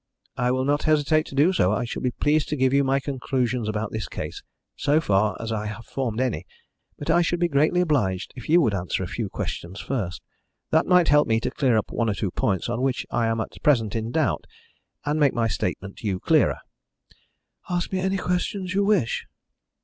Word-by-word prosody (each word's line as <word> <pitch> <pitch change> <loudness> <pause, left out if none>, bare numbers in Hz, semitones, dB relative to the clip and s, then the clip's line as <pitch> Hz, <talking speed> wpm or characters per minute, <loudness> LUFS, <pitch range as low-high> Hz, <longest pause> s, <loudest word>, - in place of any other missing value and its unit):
"I 125 0 0
will 130 +1 +1
not 145 +1 +1
hesitate 155 0 +3
to - - -9
be 155 +7 +4
so. 95 - +3
I 105 +3 0
shall 115 - -5
be 125 - +1
pleased 150 +4 +1
to 150 - 0
give 130 -1 +2
you 140 0 +4
my 135 0 +2
conclusions 125 -4 -1
about 110 0 -2
this 110 -1 -3
case - - -6 0.3
so 145 +2 +2
far 105 -6 +1
as 115 0 -4
I 105 -1 -2
have 115 +2 -7
formed 125 -4 -3
any 130 -3 -1 0.5
but - - -1
I 175 - +4
should 175 0 0
be 175 - +3
greatly 155 +4 +2
obliged 120 - 0
if 125 +1 -9
you 170 +2 +6
would 115 -9 +2
answer 90 -2 -2
a - - -3
few - - -4
questions 90 +4 -5
first. 105 -10 -3 0.5
That 160 - +3
might 180 -2 +5
help 150 0 +5
me 110 -1 +2
to - - -2
clear 125 -5 +2
up 110 - -2
one 115 -1 0
or 105 - 0
two 95 -2 -2
points 95 -1 0
on 120 +1 -2
which 130 -1 0
I 115 -1 +1
am 115 0 0
at - - -7
present 115 -7 +2
in 110 0 -2
doubt, 155 +4 0 0.6
and 150 +1 0
make 145 -3 +3
my 115 -1 +2
statement 100 -1 -3
to 110 - -5
you 95 -2 -1
clearer." - - +3 1.1
"Ask 175 -1 -1
me 185 - +1
any 190 +1 0
questions 180 +1 -2
you 200 +1 +2
wish." 200 - +1
130 Hz, 220 wpm, -24 LUFS, 110-155 Hz, 1.1 s, you